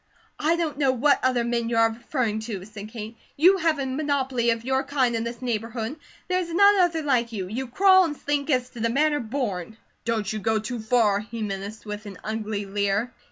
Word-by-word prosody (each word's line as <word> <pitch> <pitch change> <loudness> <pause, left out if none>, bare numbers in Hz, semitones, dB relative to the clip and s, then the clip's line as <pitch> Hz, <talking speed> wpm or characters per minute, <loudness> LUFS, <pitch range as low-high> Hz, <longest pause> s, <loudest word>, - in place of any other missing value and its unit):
"I 320 +3 +2
don't 320 -4 -2
know 275 -3 +4
what 270 +3 +3
other 255 -2 +2
men 235 -1 -1
you 230 - 0
are 225 0 +5
referring 235 -1 -2
to," 195 -4 -5
said 210 0 -9
Kate. 220 0 -7 0.2
"You 365 +6 +6
have 325 -4 +1
a 275 - -2
monopoly 265 -3 0
of 230 0 0
your 265 +1 +1
kind 260 -4 +1
in 225 - -1
this 235 +2 -6
neighbourhood; 230 +2 -3 0.3
there 365 0 +1
is 345 -2 -4
none 400 +3 +6
other 335 -3 +2
like 245 -5 +1
you. 195 -5 -4
You 250 +7 -4
crawl 375 +8 +6
and 295 -3 -4
slink 290 0 -2
as 255 -3 +1
'to 240 - -10
the 230 +1 +1
manner 295 +4 +2
born.'" 220 -5 -3 0.3
"Don't 220 -2 -1
you 215 - -3
go 220 +1 +1
too 225 +3 -4
far," 220 -3 +2
he 225 +1 -6
menaced 200 +2 -5
with 210 0 -6
an 195 -2 -8
ugly 215 -2 -3
leer. 200 +4 -1
235 Hz, 215 wpm, -25 LUFS, 220-285 Hz, 0.3 s, You